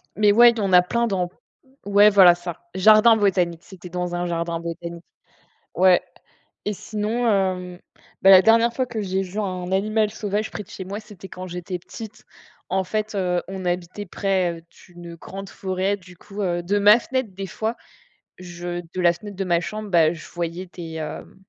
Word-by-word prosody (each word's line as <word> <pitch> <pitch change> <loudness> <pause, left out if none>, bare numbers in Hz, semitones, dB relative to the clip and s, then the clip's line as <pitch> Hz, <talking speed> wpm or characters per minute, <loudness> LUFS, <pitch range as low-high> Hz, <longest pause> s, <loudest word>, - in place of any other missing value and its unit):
Mais 210 -1 +4
ouais, 240 +3 +7
il 235 - -8
y - - -1
en 195 -2 -1
a 180 - +8
plein 235 +6 -1
dans 180 -4 -1 0.6
ouais 205 +1 +6
voilà, 185 -4 +7
c'est 175 - -18
ça, 175 -1 -6
jardin 215 +4 +6
botanique, 180 -5 +1
c'était 180 -2 -12
dans 180 0 -3
un 175 0 -2
jardin 170 0 -2
botanique. 170 0 -7 0.7
Ouais 185 0 +5 0.7
et 210 - 0
sinon, 215 +5 -2
hem, 185 -3 -1 0.4
bah, 195 - +8
la 185 -1 +9
dernière 230 +2 +4
fois 255 0 -1
que 230 -3 -5
j'ai 190 0 -1
vu 190 +2 -7
un 185 -2 -4
animal 215 +2 +1
sauvage 210 0 -3
près 210 - -6
de - - -24
chez 190 - -7
moi, 200 +3 -6
c'était 200 -3 -12
quand 185 0 -8
j'étais 180 +1 -5
petite. 220 +4 -11 0.4
En 190 0 0
fait, 215 +3 -3
heu, 180 -3 -1
on 190 -1 -6
habitait 180 +3 -3
près, 190 -2 0
heu, - - -18 0.3
d'une 175 -1 -11
grande 195 +3 -9
forêt. 190 +1 -2
Du 180 -2 -16
coup 205 0 -8
heu, 175 -2 -1
de 205 +3 0
ma 210 +3 +7
fenêtre, 260 -2 -3
des 195 0 -5
fois, 225 +4 -3 0.6
je 175 -1 -6
de 175 +2 -7
la 175 -1 +5
fenêtre 205 +2 -10
de 195 - -2
ma 175 -2 +1
chambre, 215 +3 -6
bah, 165 -1 +4
je 160 - -11
voyais 175 +2 -4
des, 170 -2 -9
hem 155 -1 -7
190 Hz, 200 wpm, -23 LUFS, 175-210 Hz, 0.7 s, la